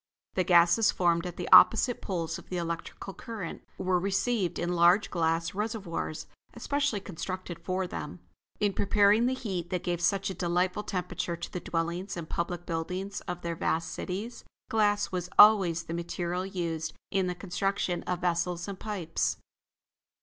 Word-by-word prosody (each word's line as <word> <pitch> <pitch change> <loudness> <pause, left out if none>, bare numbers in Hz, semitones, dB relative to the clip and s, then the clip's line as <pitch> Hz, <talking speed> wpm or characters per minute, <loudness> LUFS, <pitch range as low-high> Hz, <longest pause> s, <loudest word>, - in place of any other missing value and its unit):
The 185 - +1
gases 175 +5 +5
formed 170 -1 +1
at 175 - -8
the 180 - -4
opposite 240 +2 +7
poles 165 -4 -3
of - - -16
the 180 - -3
electrical 170 +3 -5
current, 215 -8 -6 0.2
were 185 -1 +1
received 195 +1 0
in 175 +1 -1
large 175 +4 +4
glass 165 -1 0
reservoirs, 200 -7 -3 0.3
especially 285 -6 0
constructed 185 -1 -6
for 185 +2 -2
them. 165 -2 -6 0.4
In 205 -1 +1
preparing 205 +4 +4
the 260 - 0
heat 190 -9 -4
that 180 -1 -2
gave 175 -1 -1
such 195 +3 +1
a - - -4
delightful 180 +2 0
temperature 180 -3 -3
to 170 - -7
the 180 - -2
dwellings 170 +3 -3
and 165 -2 -5
public 175 +1 -3
buildings 180 +4 -3
of 175 -1 -4
their 170 -1 -2
vast 160 0 -1
cities, 205 +6 -5 0.3
glass 205 -2 +2
was 180 -1 -3
always 190 -6 +7
the 165 - -6
material 175 +2 -3
used 165 -4 -3 0.2
in 190 -1 +1
the 180 - -2
construction 190 -1 -1
of 180 0 -1
vessels 175 0 0
and 195 -2 -6
pipes. 195 -7 -2
180 Hz, 160 wpm, -29 LUFS, 170-200 Hz, 0.4 s, opposite